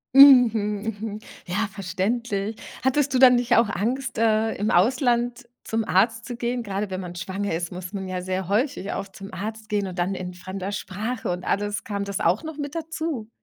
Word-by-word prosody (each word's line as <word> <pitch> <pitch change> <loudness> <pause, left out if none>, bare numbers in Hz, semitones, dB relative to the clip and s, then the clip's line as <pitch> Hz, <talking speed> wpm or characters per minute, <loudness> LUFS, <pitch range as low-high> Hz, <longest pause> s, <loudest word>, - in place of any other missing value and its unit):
Mhm, 230 -7 +7 0.2
mhm. 215 -1 -5 0.3
Ja, 200 +5 0
verständlich. 200 +3 -2 0.3
Hattest 270 +1 +2
du 255 - +3
dann 250 -1 +8
nicht 240 -1 +2
auch 230 -2 +4
Angst, 245 +6 -2
äh, 220 0 +2
im 210 +2 -1
Ausland 240 +4 +2 0.2
zum 225 0 -1
Arzt 225 +5 +2
zu 245 - -5
gehen? 240 0 -2
Grade 200 -1 -3
wenn 185 -1 -3
man 180 -2 -7
schwanger 190 +2 -3
ist, 170 0 -3
muss 180 +1 -7
man 190 -1 -4
ja 185 -1 -3
sehr 185 0 -3
häufig 215 -1 0
auch 195 - -3
zum 195 0 -11
Arzt 215 +3 -6
gehen 205 -2 0
und 185 0 -7
dann 180 +3 +1
in 180 -1 -5
fremder 185 +2 -5
Sprache 215 +5 -4
und 180 +1 -4
alles. 205 0 -1
Kam 200 -1 -2
das 200 -1 -3
auch 175 - +2
noch 315 -2 -6
mit 290 0 -5
dazu? 320 -8 -3
210 Hz, 195 wpm, -24 LUFS, 190-240 Hz, 0.3 s, dann